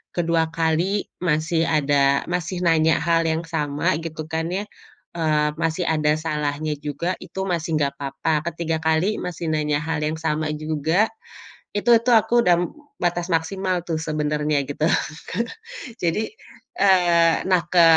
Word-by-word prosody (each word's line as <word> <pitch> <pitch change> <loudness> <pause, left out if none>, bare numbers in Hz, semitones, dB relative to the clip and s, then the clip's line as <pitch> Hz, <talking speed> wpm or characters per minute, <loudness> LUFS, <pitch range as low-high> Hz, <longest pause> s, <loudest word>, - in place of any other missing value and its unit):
ke-2 165 -1 +2
kali 165 +5 +1 0.2
masih 165 0 +1
ada 140 -2 +2
masih 180 +1 -2
nanya 160 -1 +4
hal 165 0 +4
yang 160 +1 -1
sama 150 -3 0
gitu 160 -1 -5
kan 160 0 -1
ya, 190 +3 -2 0.5
eee, 155 -2 +2
masih 165 +2 0
ada 150 -2 +2
salahnya 150 -1 -2
juga 170 +5 -2
itu - - -8
masih 165 -1 -2
gak 140 -1 +1
apa-apa, 140 +3 -2 0.2
ke-3 165 -1 -2
kali 160 +6 +1
masih 175 -1 -5
nanya 150 -1 +1
hal 160 0 -2
yang 155 +1 -2
sama 155 -1 -1
juga, 160 +7 +1 0.7
itu 240 +4 +1 0.2
tuh 245 - +5
aku 240 +2 +2
udah 175 -1 +6 0.5
batas 175 0 0
maksimal 185 +2 -1
tuh 160 -2 0
sebenarnya 150 -1 0
gitu 145 +2 -2 0.5
Kak 230 +6 -1 0.6
jadi, 170 +4 +1 0.6
eee, 175 -4 +5
nah 185 -2 +4
ke 180 - +6
160 Hz, 145 wpm, -23 LUFS, 150-175 Hz, 0.7 s, udah